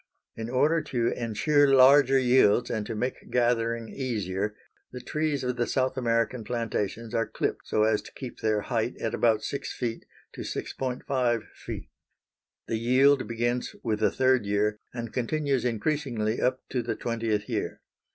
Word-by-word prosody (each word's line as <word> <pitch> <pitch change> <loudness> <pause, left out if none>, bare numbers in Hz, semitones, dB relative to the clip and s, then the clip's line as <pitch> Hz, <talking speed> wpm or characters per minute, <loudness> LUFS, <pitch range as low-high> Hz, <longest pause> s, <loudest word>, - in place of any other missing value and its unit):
In 115 0 -5
order 150 +6 +3
to 120 -5 0
insure 145 +6 +2
larger 135 0 +7
yields 125 -3 +4
and 110 -3 -2
to 115 - -4
make 125 +4 -3
gathering 115 -1 +1
easier 105 -6 -3 0.4
the 125 - -7
trees 150 0 -1
of 125 -1 -2
the 120 - 0
South 130 -1 0
American 115 -1 0
plantations 115 -1 -3
are 115 -1 +1
clipped - - -3
so 105 - +2
as 110 -1 +2
to - - -13
keep 130 -3 -8
their 110 -1 +1
height 120 +1 -2
at 115 - -2
about 110 -2 +2
6 140 -1 -4
feet 115 -2 -4 0.3
to - - -7
6.5 125 -2 -2
feet. - - -8 0.8
The 115 - -1
yield 130 +4 +4
begins 120 +1 -1
with 110 -3 0
the 110 - +3
third 130 -2 +2
year 105 +1 +1
and 115 -2 -6
continues 135 +1 0
increasingly 120 -2 -1
up 130 +1 +1
to 125 - -1
the 120 - -3
twentieth 115 -3 -2
year. - - -3
120 Hz, 160 wpm, -27 LUFS, 110-130 Hz, 0.8 s, larger